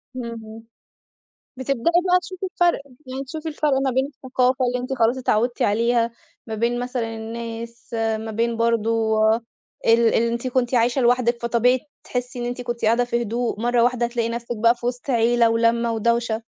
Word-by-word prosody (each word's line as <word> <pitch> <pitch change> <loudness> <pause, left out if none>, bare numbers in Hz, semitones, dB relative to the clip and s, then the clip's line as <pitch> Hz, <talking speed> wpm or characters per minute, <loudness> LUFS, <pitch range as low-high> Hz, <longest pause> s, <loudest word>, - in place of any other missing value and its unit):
اهم. 225 -2 -7 0.9
بتبدئي 260 -2 -2 0.3
بقى 360 - +5
تشوفي 370 +2 -6
الفرق، 350 -5 +2 0.3
يعني 265 +1 -4
تشوفي 315 +4 -6
الفرق 300 -1 0
ما 265 - +1
بين 260 +2 +1
الثقافة 255 -2 0
اللي 245 0 0
أنتِ 255 +2 -4
خلاص 240 0 +2
اتعودتِ 240 -1 0
عليها، 230 +2 +2 0.4
ما 220 - -4
بين 235 +2 0
مثلًا 245 -2 -3
الناس، 230 +1 -7
ما 225 -1 -1
بين 230 +1 -1
برضو 225 -1 +1
ال 220 +1 +2 0.5
اللي 230 0 +4
أنتِ 235 +2 -2
كنتِ 250 0 0
عايشة 240 +2 +2
لوحدِك، 240 -1 +2
فطبيعي 240 +2 +2 0.2
تحسي 250 0 -4
إن 240 - -3
أنتِ 245 +1 -4
كنتِ 240 -2 -3
قاعدة 235 +3 +3
في 240 0 -1
هدوء، 230 0 -2
مرة 240 0 +2
واحدة 245 -1 +2
هتلاقي 235 -1 -1
نفسِك 235 0 -4
بقى 230 +2 +4
في 240 0 -9
وسط 245 +2 -3
عيلة 235 -1 +3
ولمة 230 +1 +2
ودوشة. 235 0 0
235 Hz, 170 wpm, -22 LUFS, 230-250 Hz, 0.9 s, بقى